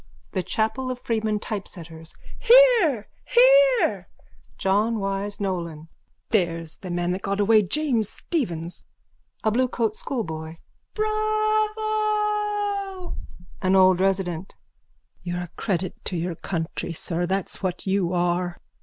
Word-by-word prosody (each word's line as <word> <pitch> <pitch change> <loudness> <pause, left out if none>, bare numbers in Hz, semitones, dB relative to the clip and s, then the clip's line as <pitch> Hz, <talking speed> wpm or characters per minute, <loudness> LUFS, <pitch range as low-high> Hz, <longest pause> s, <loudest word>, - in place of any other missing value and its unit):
THE 185 - -1
CHAPEL 220 +8 -1
OF 255 - -3
FREEMAN 220 -3 -1
TYPESETTERS: 165 -7 -7 0.2
Hear! 470 - +6 0.2
Hear! - - +5 0.5
JOHN 210 +4 +1
WYSE 195 +1 -3
NOLAN: 170 -5 -3 0.4
There's 165 -6 0
the 185 - -8
man 175 0 -1
that 185 +2 -2
got 200 +1 -2
away 215 +1 +5
James 230 - 0
Stephens. 175 - -3 0.6
A 220 - +2
BLUECOAT 235 -2 0
SCHOOLBOY: 160 -12 -4 0.4
Bravo! 425 -2 0 0.5
AN 185 0 +3
OLD 185 -1 +6
RESIDENT: 190 -2 -1 0.7
You're 175 0 -3
a 175 - -6
credit 185 -2 -3
to 180 - -2
your 170 +1 -2
country, 165 0 -4
sir, 170 +1 -2
that's 190 0 -2
what 185 -2 -3
you 190 -3 +1
are. 175 0 0
200 Hz, 115 wpm, -24 LUFS, -, 0.7 s, Hear